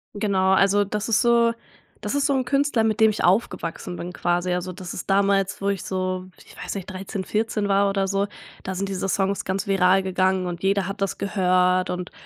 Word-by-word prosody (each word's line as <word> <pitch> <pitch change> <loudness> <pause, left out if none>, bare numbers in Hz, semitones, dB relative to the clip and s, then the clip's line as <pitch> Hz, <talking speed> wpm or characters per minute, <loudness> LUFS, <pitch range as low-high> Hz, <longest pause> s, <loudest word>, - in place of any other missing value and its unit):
Genau. 195 -2 +2
Also, 200 +1 +4
das 210 +2 -3
ist 220 - +3
so 235 -1 +4 0.5
das - - -3
ist 285 0 +1
so 280 - +1
'n 260 -1 0
Künstler, 275 -3 +1
mit 220 0 0
dem 220 0 +6
ich 215 - -2
aufgewachsen 175 -3 0
bin 180 +1 -6
quasi. 175 +1 0
Also, 180 +1 -3
das 180 0 -8
ist 180 - -7
damals, 195 0 +2
wo 200 - 0
ich 195 -2 -2
so, 185 -1 -3 0.2
ich - - -16
weiß - - -6
nicht, 195 -3 -5
13, 190 +1 -5
14 215 +1 -1
war 200 0 +3
oder 195 -1 0
so, 200 +1 0 0.4
da 190 - -4
sind 195 +2 -2
diese 195 0 -3
Songs 195 +1 0
ganz 190 +1 -2
viral 195 -1 +3
gegangen 190 0 +1
und 175 -1 -5
jeder 195 -1 +1
hat 195 +1 -6
das 195 - -1
gehört 185 -2 +2
und 180 0 -4
195 Hz, 215 wpm, -23 LUFS, 185-205 Hz, 0.5 s, dem